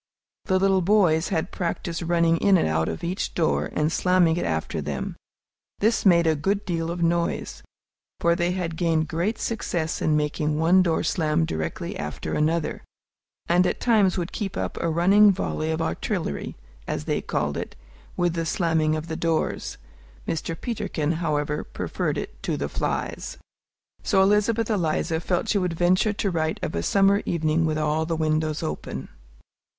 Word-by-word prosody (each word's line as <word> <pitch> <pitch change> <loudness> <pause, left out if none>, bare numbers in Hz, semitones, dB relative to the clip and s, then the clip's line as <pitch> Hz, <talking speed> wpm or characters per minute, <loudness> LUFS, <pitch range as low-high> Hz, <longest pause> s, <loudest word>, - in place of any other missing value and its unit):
The 185 - +2
little 190 0 +3
boys 175 -4 +3
had 175 -2 -1
practised 170 -1 -3
running 170 -1 +2
in 195 +2 +4
and - - +1
out 80 +1 0
of - - -5
each 180 +3 -3
door, 165 -2 +1
and 150 +1 0
slamming 180 -1 +3
it 175 - -2
after 80 -1 -2
them. 70 -1 -4 0.6
This 220 0 +2
made 170 -2 +5
a 160 - +4
good 195 +7 -1
deal 165 -3 -2
of 170 0 -2
noise, 170 0 -1 0.6
for 170 - +3
they 175 +1 0
had 170 -3 -3
gained 160 -2 +1
great 175 +7 -1
success 175 -8 -2
in 155 -1 +2
making 150 0 -1
one 170 +4 +5
door 170 -3 +1
slam 160 -1 +1
directly 80 - -4
after 75 0 -4
another, 160 +1 0 0.7
and 180 +1 +4
at - - -2
times 210 -6 +3
would 175 -1 -3
keep 195 -3 -4
up - - -3
a 170 - -1
running 195 +6 +5
volley 160 -4 -2
of 160 +1 -1
artillery, 170 - -3 0.3
as - - -2
they - - 0
called - - -2
it, - - -5 0.4
with 175 -2 +1
the 165 -1 -2
slamming 160 -3 +1
of 155 0 -4
the 160 - -4
doors. 165 -1 -1 0.5
Mr. 165 0 -3
Peterkin, 160 -10 -2
however, 150 -3 -1
preferred - - -3
it - - -6
to - - -2
flies. - - -3 0.6
So 190 -3 +3
Elizabeth 210 +3 +2
Eliza 165 -3 0
felt 180 +5 -1
she 205 - +2
would 180 -2 -1
venture 180 +5 +2
to 200 -1 -1
write 160 -2 -1
of - - -2
a 85 - -1
summer 200 - +3
evening 160 0 +1
with 155 -1 -1
all 155 +1 0
the 165 - -1
windows 155 0 0
open. 160 - -5
170 Hz, 170 wpm, -25 LUFS, 155-185 Hz, 0.7 s, made